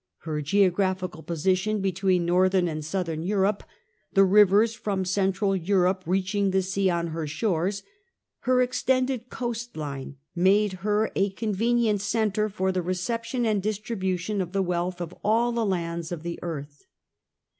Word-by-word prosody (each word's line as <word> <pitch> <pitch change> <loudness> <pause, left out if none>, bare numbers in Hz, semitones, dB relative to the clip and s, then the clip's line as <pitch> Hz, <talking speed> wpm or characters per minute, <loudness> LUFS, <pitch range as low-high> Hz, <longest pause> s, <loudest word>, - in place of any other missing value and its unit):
Her 155 -2 -3
geographical 185 0 +1
position, 185 +6 0
between 185 -2 +1
northern 185 +1 +3
and 155 -2 -4
southern 165 -1 -2
Europe, 195 +3 +1 0.5
the 195 - +6
rivers 205 +3 +5
from 200 -4 -2
central 195 +1 +1
Europe 185 +1 +1
reaching 195 +2 +1
the 190 0 +1
sea 190 +1 0
on 170 -1 -1
her 160 -1 -4
shores, 190 +3 -1 0.6
her 255 0 +3
extended 255 0 0
coast 240 -4 -5
line, 140 -3 -5 0.2
made 195 +3 +3
her 210 +2 +1
a 195 +1 +2
convenient 220 +1 0
centre 215 -1 0
for 190 -1 -1
the 185 -1 -1
reception 230 +7 -2
and 215 -3 +1
distribution 200 -2 -2
of 180 0 -5
the 195 -1 +1
wealth 180 0 -2
of 175 0 -5
all 230 +3 +2
the 235 -1 0
lands 170 -4 -2
of 170 -3 -5
the 170 0 -5
earth. 145 -4 -7
190 Hz, 145 wpm, -26 LUFS, 175-210 Hz, 0.6 s, the